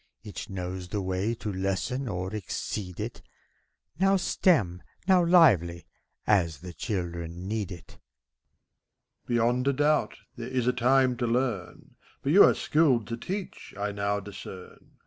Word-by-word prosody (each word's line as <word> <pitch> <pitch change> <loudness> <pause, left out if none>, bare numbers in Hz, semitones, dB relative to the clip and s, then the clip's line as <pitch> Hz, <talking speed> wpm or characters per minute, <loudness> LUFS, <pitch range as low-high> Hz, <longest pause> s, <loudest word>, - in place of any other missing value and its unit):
Each 105 0 -7
knows 90 -1 -5
the 105 - -3
way 95 +4 -1
to 105 -2 -5
lessen 95 +8 -2
or 95 -1 -3
exceed 95 -2 -4
it, - - -5 0.8
Now 195 +1 +4
stem, 105 - +2 0.3
now 185 -2 +5
lively, 105 - +4 0.4
as 85 -8 +2
the 90 -1 -8
children 85 -3 -4
need 105 -2 -2
it. 85 -2 -11
MEPHISTOPHELES. - - -51
Beyond 120 +2 +1
a 140 - +3
doubt, 150 +2 +1 0.2
there 120 0 -5
is 125 -2 -1
a 125 - +3
time 125 +1 +3
to 120 0 -1
learn; 115 -6 -2 0.3
But 140 - +1
you 195 +5 +9
are - - +4
skilled 140 -8 +2
to 115 - -2
teach, 190 - -6
I 100 0 -2
now 100 0 -1
discern. 95 -2 -11
105 Hz, 145 wpm, -28 LUFS, 90-130 Hz, 0.8 s, you